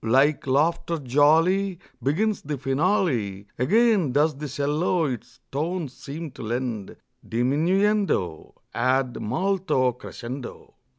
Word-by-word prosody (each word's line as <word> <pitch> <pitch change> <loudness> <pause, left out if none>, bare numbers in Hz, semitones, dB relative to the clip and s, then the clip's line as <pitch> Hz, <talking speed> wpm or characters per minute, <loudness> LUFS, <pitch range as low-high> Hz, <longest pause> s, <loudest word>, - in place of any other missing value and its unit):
Like 135 +6 +3
laughter 165 +5 +1
jolly 160 +8 +3 0.2
Begins 195 - +1
the 145 0 -4
finale; 135 - 0
Again 205 - +3
does 150 +2 +3
the 150 +2 -5
'cello 150 +5 0
its 125 -6 -5
tones 155 0 -2
seem 150 +3 -7
to 130 - -11
lend 115 -2 -3 0.3
Diminuendo 155 - +1 0.2
ad 130 +1 +1
molto 175 - +1
crescendo. 125 +1 -8
145 Hz, 105 wpm, -25 LUFS, 125-175 Hz, 0.3 s, Like